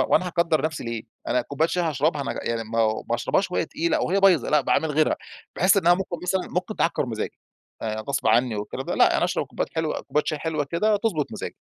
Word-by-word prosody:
هو - - +4
أنا 185 - -1
هاكدر 170 -4 +1
نفسي 155 -4 -2
ليه؟ 115 -1 -4 0.3
أنا 125 - +2
كوباية 155 +6 0
شاي 180 - 0
هاشربها 150 -1 0
ما 135 - -3
يعني 115 -1 -2
ما 115 +1 -4
هو 110 -1 +1
ما - - +3
أشربهاش 190 +10 0
وهى 180 - 0
تقيلة 170 +1 0
أو - - 0
وهي 195 +2 +2
بايظة 180 -9 +4
لأ، 150 -1 +5
باعمل 160 +4 +1
غيرها. 155 +1 +2 0.4
باحس 185 +3 +4
إنها 175 -2 +5
ممكن 185 -1 -3
مثلًا، 185 +1 -1
ممكن 180 +4 -3
تعكر 165 -5 +1
مزاجي. 110 -2 -4 0.4
آآ 110 -1 -2
غصب 140 +5 -2
عني 115 0 +3
والكلام 105 - -5
ده، - - -1
لأ، - - +5
يعني - - +2
أشرب - - -1
كوبايات - - -4
حلوة 160 -1 -1
كوباية 150 - 0
شاي 155 - -1
حلوة 155 -1 -1
كده، 205 +9 +1
تضبط 195 -9 -1
مزاجي. - - -5
155 Hz, 235 wpm, -24 LUFS, 125-180 Hz, 0.4 s, لأ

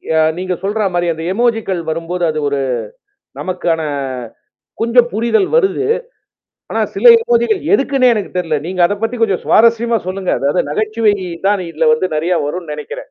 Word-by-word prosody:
அ - - +4 0.2
நீங்க 185 0 -2
சொல்ற 205 +1 0
மாரி 175 0 0
அந்த 160 - -7
இமோஜிக்கல் 225 -5 0
வரும்போது 165 +2 -3
அது 155 0 -2
ஒரு 140 - -1 0.8
நமக்கான. 175 -3 -1 1.0
கொஞ்சம் 235 +1 +4
புரிதல் 230 - +1
வருது. 400 -2 +1 0.9
ஆனா, - - -1 0.2
சில - - -3
இமோஜிக்கல் 465 -3 +1
எதுக்குன்னே 275 -6 +3
எனக்கு 210 - -4
தெரல. 165 -4 0
நீங்க 180 +1 -5
அத 190 - 0
பத்தி 225 +2 -1
கொஞ்சம் 200 -5 +1
சுவாரஸ்யமா 230 +1 +3
சொல்லுங்க. 185 0 -3
அதாவது 140 +1 0
நகைச்சுவை 215 +4 +1 0.3
தான் 205 -1 +2
இதில 160 0 0
வந்து 170 +4 0
நெறைய 170 +2 0
வரும்னு 165 +1 -5
நெனைக்கிறேன். 150 0 -7
195 Hz, 150 wpm, -16 LUFS, 170-235 Hz, 1.0 s, அ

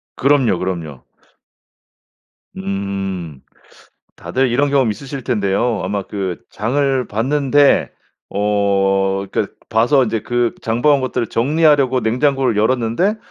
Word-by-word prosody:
그럼요 135 -9 +2
그럼요. 85 -7 -5 1.5
음. 95 -6 -4 0.8
다들 130 0 -1
이런 140 +3 +1
경험 135 -5 +2
있으실 135 +5 -6
텐데요. 110 -1 0
아마 100 +1 -2
그 95 -2 -5
장을 130 +2 -1
봤는데 140 +5 +2 0.4
어 100 -1 +1
그러니까 - - -2 0.2
봐서 125 +4 +3
이제 110 -1 -2
그 120 -1 0
장 115 +1 -1
봐 150 - +4
온 140 - +1
것들을 120 -2 -2
정리하려고 140 0 +2
냉장고를 125 +1 +1
열었는데 125 - +1
115 Hz, 250 characters per minute, -18 LUFS, 100-135 Hz, 1.5 s, 봐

